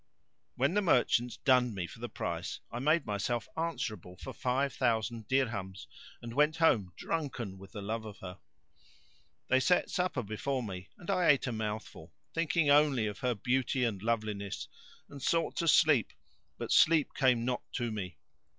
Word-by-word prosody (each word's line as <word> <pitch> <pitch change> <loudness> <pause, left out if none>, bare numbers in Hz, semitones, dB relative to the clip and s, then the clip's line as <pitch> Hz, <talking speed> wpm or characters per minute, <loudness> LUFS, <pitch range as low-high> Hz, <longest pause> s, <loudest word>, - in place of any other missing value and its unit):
When 140 +6 +1
the 210 - +3
merchants 125 - +2
dunned 125 -5 +3
me 90 -2 -2
for - - -11
the - - -5
price, - - -4
I 120 - -4
made 155 +5 +2
myself 105 +3 -2
answerable 110 - -4
for - - -8
five 135 +2 0
thousand 115 -2 0
dirhams 110 -8 -1 0.4
and 115 -1 -6
went 150 +4 +3
home, 115 - +3
drunken 125 -12 -3
with 95 +2 -13
the 105 -3 -6
love 110 +2 -3
of 105 -1 -9
her. 95 -1 -9 1.1
They 130 - +5
set 180 +7 +2
supper 180 -8 0
before 125 +5 -2
me 95 -3 -7
and 175 +2 -4
I 185 -3 +2
ate 145 - +5
a 125 - -2
mouthful, 110 -1 -5 0.2
thinking 165 -1 +1
only 145 -5 +4
of 105 -1 -4
her 125 -2 0
beauty 125 +4 0
and 110 -6 -1
loveliness, 105 -3 -2 0.4
and 140 -1 -11
sought 165 +4 +1
to 170 - 0
sleep, 150 -6 +4 0.4
but - - -5
sleep 160 -2 +5
came 125 -4 +2
not 125 -1 -1
to 120 -3 -2
me. 95 -6 -5
120 Hz, 170 wpm, -31 LUFS, 105-145 Hz, 1.1 s, They